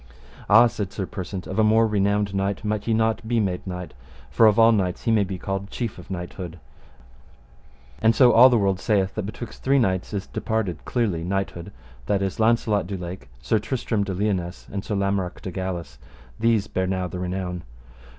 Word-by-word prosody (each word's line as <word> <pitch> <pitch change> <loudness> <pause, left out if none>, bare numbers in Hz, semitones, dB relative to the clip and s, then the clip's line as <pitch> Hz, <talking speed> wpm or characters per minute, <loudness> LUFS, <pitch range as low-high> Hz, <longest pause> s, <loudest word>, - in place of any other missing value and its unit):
Ah, 110 +3 +8
said 105 -4 -2
Sir 100 -1 -3
Persant, 95 0 -6
of 95 - -3
a - - +5
more 110 +1 +5
renowned 100 -1 +1
knight 100 +1 -1
might 105 0 -2
ye 115 - +2
not 110 0 0
be 120 0 +1
made 95 -3 -2
knight; 90 -1 -6 0.4
for 115 - +6
of 105 - +4
all 115 0 +7
knights 95 -5 0
he 115 - +1
may 110 -2 +4
be 95 -1 -4
called 95 +1 -4
chief 115 -5 -4
of 90 - -13
knighthood; 90 -1 -6 1.4
and 115 0 +4
so 125 +1 +6
all 125 +3 +9
the 120 - +3
world 100 -3 +1
saith, 100 -3 +1
that 105 -3 -3
betwixt 110 +1 -8
three 135 +1 +3
knights 95 -8 0
is 100 -2 -3
departed 110 -7 -2
clearly 100 -10 -1
knighthood, 95 0 -3 0.4
that 100 -1 +1
is 95 +1 -3
Launcelot 110 -4 +2
du 100 0 -4
Lake, 90 +1 -7
Sir 110 +10 +2
Tristram 110 -2 -1
de 95 -2 -3
Liones, 95 -3 -2
and 100 -1 -4
Sir 105 - -3
Lamorak 100 -2 -1
de 95 - -6
Galis: 85 -8 -5 0.4
these 115 -3 +2
bear 95 -2 -2
now 95 -1 -1
the 90 +1 -6
renown. 90 -1 -3
100 Hz, 195 wpm, -24 LUFS, 95-110 Hz, 1.4 s, all